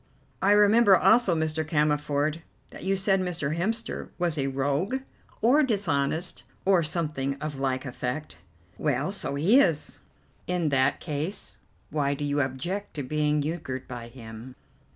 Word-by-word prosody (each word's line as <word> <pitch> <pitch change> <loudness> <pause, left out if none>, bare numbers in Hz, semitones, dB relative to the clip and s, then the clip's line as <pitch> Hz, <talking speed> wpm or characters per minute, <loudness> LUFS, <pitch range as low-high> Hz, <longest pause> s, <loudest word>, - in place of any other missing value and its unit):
"I 200 +2 +5
remember 210 -1 +6
also, 220 -6 +4
Mr. 160 0 -1
Cammerford, 150 0 0 0.3
that - - -9
you 195 +1 +1
said 195 0 +2
Mr. 165 -5 -2
Hemster 220 +7 -2
was 175 -3 0
a 135 -3 -1
rogue 145 - -1 0.4
or 260 +7 +5
dishonest, 175 - 0 0.2
or 190 -2 +5
something 150 -4 -2
of 145 -1 -5
like 130 0 -1
effect." 125 - -5 0.4
"Well, 145 +3 0
so 200 -8 -2
he 190 - +5
is." 165 - +1 0.5
"In 180 -3 0
that 135 0 +2
case, 155 +5 -4 0.3
why 145 -2 0
do 145 - -3
you 145 0 +1
object 160 +10 -3
to 145 - -3
being 150 +2 +1
euchred 145 -5 -4
by 120 -2 -7
him?" 120 +1 -10
150 Hz, 145 wpm, -27 LUFS, 140-185 Hz, 0.5 s, remember